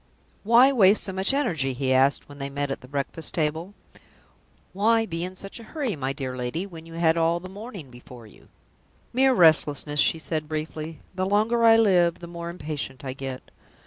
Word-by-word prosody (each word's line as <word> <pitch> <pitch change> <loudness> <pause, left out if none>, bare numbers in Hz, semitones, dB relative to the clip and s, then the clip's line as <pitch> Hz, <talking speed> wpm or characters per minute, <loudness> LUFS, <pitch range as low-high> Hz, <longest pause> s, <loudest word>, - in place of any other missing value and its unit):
"Why 235 +5 +6
waste 205 -5 +4
so 190 - -2
much 190 +4 +2
energy?" 160 - 0
he 130 +1 0
asked, 135 +2 +2
when 145 0 -13
they 140 0 -4
met 140 0 -3
at - - -4
the 125 - -13
breakfast 140 +3 -3
table. 160 +5 -2 1.0
"Why 225 +4 +2
be 165 -4 -4
in 185 +1 -6
such 195 +4 -8
a - - -11
hurry, 260 -2 -3
my 135 -2 -3
dear 130 -2 -5
lady, 125 +9 -3
when 165 -4 -11
you 165 - -11
had 165 -1 +2
all 165 +1 +2
the 185 - -9
morning 195 - -9
before 120 -1 -13
you?" 105 - -18 0.7
"Mere 260 +1 +4
restlessness!" 150 - +3
she 165 - +4
said, 155 -1 -4
briefly. 155 0 -5
"The 185 0 -2
longer 220 +4 +2
I 225 0 +7
live, 180 -6 +3
the 175 - -10
more 170 0 -7
impatient 150 -6 -6
I 130 - -4
get." 135 -1 -7
165 Hz, 195 wpm, -25 LUFS, 140-195 Hz, 1.0 s, I